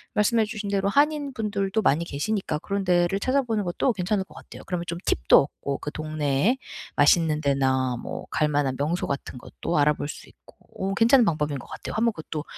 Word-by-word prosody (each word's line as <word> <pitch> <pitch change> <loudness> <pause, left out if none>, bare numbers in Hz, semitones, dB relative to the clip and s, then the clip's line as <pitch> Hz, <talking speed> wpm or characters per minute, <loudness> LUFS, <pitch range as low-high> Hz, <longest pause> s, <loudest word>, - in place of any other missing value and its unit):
말씀해 220 +1 +3
주신 210 -1 -5
대로 200 0 +1
한인 290 +3 +2
분들도 210 -4 -1
많이 160 +4 +2
계시니까 170 +2 -2
그런 200 +4 -2
데를 175 +1 +2
찾아 265 +6 +1
보는 225 -4 -1
것도 180 +8 0
괜찮을 195 +1 -1
것 190 - -18
같아요. - - -12
그러면 180 -2 -3
좀 170 - -3
팁도 - - +5 0.2
얻고, 140 -1 -2
그 150 - -5
동네에 155 - 0 0.4
맛있는 155 +1 +4
데나 130 -3 +1
뭐 - - -6
갈 155 - +2
만한 145 -3 0
명소 155 +5 -1
같은 140 -2 -4
것도 170 +6 -4
알아볼 145 0 +2
수 150 - -9
있고 - - -21 0.4
어 - - -1
괜찮은 235 +4 +5
방법인 150 -5 -1
것 - - -12
같아요. - - -7
한번 230 +1 +2
그것도 155 -2 -6
175 Hz, 400 characters per minute, -25 LUFS, 145-215 Hz, 0.4 s, 팁도